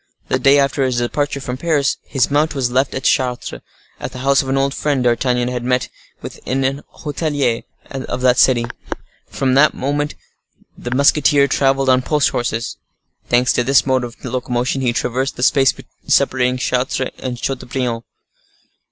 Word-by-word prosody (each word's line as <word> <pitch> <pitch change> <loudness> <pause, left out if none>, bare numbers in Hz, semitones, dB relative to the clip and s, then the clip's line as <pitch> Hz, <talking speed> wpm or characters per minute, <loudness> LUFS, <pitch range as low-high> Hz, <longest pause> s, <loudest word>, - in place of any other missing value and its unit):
The 130 - +1
day 140 +2 +5
after 140 0 +1
his 130 -2 0
departure 140 +4 -1
from 125 -2 -5
Paris, 145 -2 +1
his 135 -2 0
mount 150 +2 +1
was 125 -3 0
left 130 +2 +1
at 130 - -4
Chartres, 125 - 0 0.4
at - - -5
the - - -9
house 140 0 +4
of 135 - -6
an 135 - +1
old 135 0 +1
friend 145 -4 0
D'Artagnan 125 0 +1
had 125 -1 -3
met 125 0 0 0.3
with - - -8
in 135 +1 -1
an 135 +2 -1 0.2
hotelier 145 -5 -1 0.3
of 130 -2 -4
that 125 -1 +3
city. 120 -3 +4 0.6
From 130 -1 0
that 140 +3 +4
moment 145 +2 -2 0.6
the 120 - -7
musketeer 140 +2 +4
travelled 135 -1 +1
on 130 0 +4
post 150 +1 +1
horses. 115 -2 -3 0.5
Thanks 120 0 +3
to 125 - +1
this 135 +1 +3
mode 130 -2 +1
of 120 -1 -7
locomotion, 125 +1 -2
he 125 -2 +1
traversed 125 +3 -2
the 125 - -4
space 135 -1 +4 0.4
separating 125 -1 +2
Chartres 130 +1 -1
from 125 -1 -4
Chateaubriand. 125 -2 -3
130 Hz, 170 wpm, -18 LUFS, 125-140 Hz, 0.6 s, day